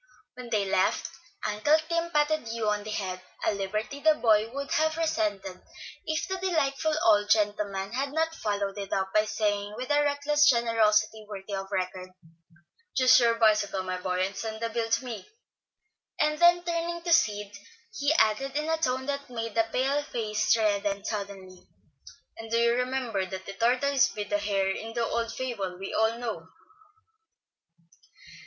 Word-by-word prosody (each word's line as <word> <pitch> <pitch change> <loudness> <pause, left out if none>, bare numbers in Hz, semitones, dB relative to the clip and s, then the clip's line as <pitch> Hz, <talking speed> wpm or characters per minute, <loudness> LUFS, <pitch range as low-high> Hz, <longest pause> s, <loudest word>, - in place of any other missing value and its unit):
When 250 -1 -9
they 210 -3 +1
left, 190 0 +1 0.3
Uncle 215 +9 +3
Tim 335 0 -1
patted 300 -4 +1
Hugh 225 -1 -2
on 210 0 -1
the 215 - -7
head, 185 -3 -3 0.2
a - - +2
liberty 210 +7 -3
the 315 +1 +4
boy 220 -4 +3
would 280 +1 -5
have 315 +1 +1
resented 210 - -1 0.5
if 315 0 -1
the 380 -1 -2
delightful 315 -4 0
old 205 -1 +4
gentleman 205 -1 0
had 275 +2 -2
not 320 +2 0
followed 205 -6 -3
it 200 -1 -6
up 190 0 -1
by 215 0 +4
saying, 205 -1 -1
with 255 +3 -4
a 290 0 +4
reckless 295 +2 +3
generosity 220 -3 +2
worthy 200 0 -7
of 195 0 -4
record, 185 0 -3 0.9
"Choose 255 -1 +7
your 235 -1 +3
bicycle, 210 -4 +2
my 185 0 -3
boy, 185 0 0
and 195 +1 -6
send 220 +2 -5
the 230 0 -2
bill 225 0 -2
to 230 +3 +1
me." 240 - -7 0.9
Then 345 +4 +4
turning 340 0 -2
to 340 -1 +2
Sid 210 -10 +1 0.4
he 280 +7 +1
added, 270 0 +2
in 305 +2 -1
a 320 - +2
tone 260 -4 -1
that 280 -1 -4
made 230 -2 -4
the 225 0 +2
pale 270 +4 +1
face 215 -4 0
redden 205 -2 0
suddenly, 195 -3 -6 0.7
"And 225 0 -8
do 230 - +1
you 235 0 +3
remember 250 -6 -1
that 190 +1 -7
the 195 - -7
tortoise 255 +5 +2
beat 210 -1 -6
the 205 - +2
hare 200 -2 0
in 225 +3 -6
the 235 -1 +1
old 230 0 -2
fable 205 -9 -4
we 195 +1 -6
all 220 +1 +2
know." 235 -1 -5
225 Hz, 170 wpm, -28 LUFS, 205-280 Hz, 0.9 s, Choose